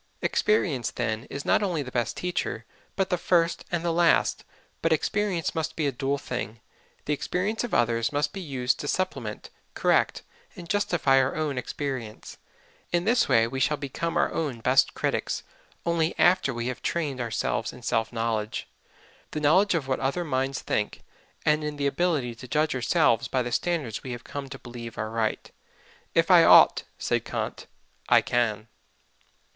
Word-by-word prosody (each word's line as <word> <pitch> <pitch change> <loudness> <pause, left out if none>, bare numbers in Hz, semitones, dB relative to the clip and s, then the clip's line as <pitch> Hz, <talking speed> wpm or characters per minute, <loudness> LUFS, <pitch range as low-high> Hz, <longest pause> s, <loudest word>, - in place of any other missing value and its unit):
Experience, 160 - +1
then, 115 -1 -3
is 140 +1 -6
not - - +3
only 175 -7 0
the 125 - -9
best 120 -3 -1
teacher, 180 0 -3 0.3
but 195 -1 0
the 180 - +1
first 170 -2 +1
and 175 -1 -1
the 170 - +1
last. 170 0 +3 0.4
But 165 - +1
experience 180 +2 0
must 160 -1 -2
be 155 - -1
a 140 - +1
dual 135 +2 -1
thing 120 -5 -5 0.5
the 150 - 0
experience 190 - -1
of 240 - -4
others 115 -1 +2
must 145 0 0
be 195 - -5
used 130 -6 -1
to 145 - -4
supplement, 185 +5 -3 0.2
correct - - +2 0.3
and 175 -4 -9
justify 175 -8 +2
our 130 0 +1
own 155 -3 -1
experience; 125 -4 -5 0.5
in 175 0 +1
this 235 +3 +3
way 115 0 +5
we 130 +3 -4
shall 150 +2 +2
become 150 +4 -3
our - - +2
own 140 -7 -2
best 130 +3 +3
critics - - -1 0.4
only 170 -1 +1
after 175 -5 +4
we 120 -1 -4
have 130 0 -4
trained 145 -7 -2
ourselves 115 -2 -1
in - - -13
self 115 0 0
knowledge, 115 -2 -2 0.6
the 155 - -4
knowledge 180 +6 +4
of 145 -5 -1
what 130 - 0
other 140 +6 -1
minds 135 -2 -1
think, 105 - -2 0.4
and 150 0 +3
in 150 -1 -4
the 140 - -1
ability 140 -5 0
to 115 +3 -11
judge 155 +4 +1
ourselves 125 -2 +2
by 130 -1 0
the 120 - -4
standards 155 -11 -1
we 130 - -5
have 120 - -8
come 140 -1 -6
to 135 - -7
believe 120 -2 -9
are 110 +1 -3
right. 110 -1 -2 0.6
"If - - +3
I - - +8
ought," - - +7
said - - 0
Kant, - - -4 0.4
"I - - +7
can." 115 -3 0
140 Hz, 175 wpm, -26 LUFS, 120-170 Hz, 0.6 s, I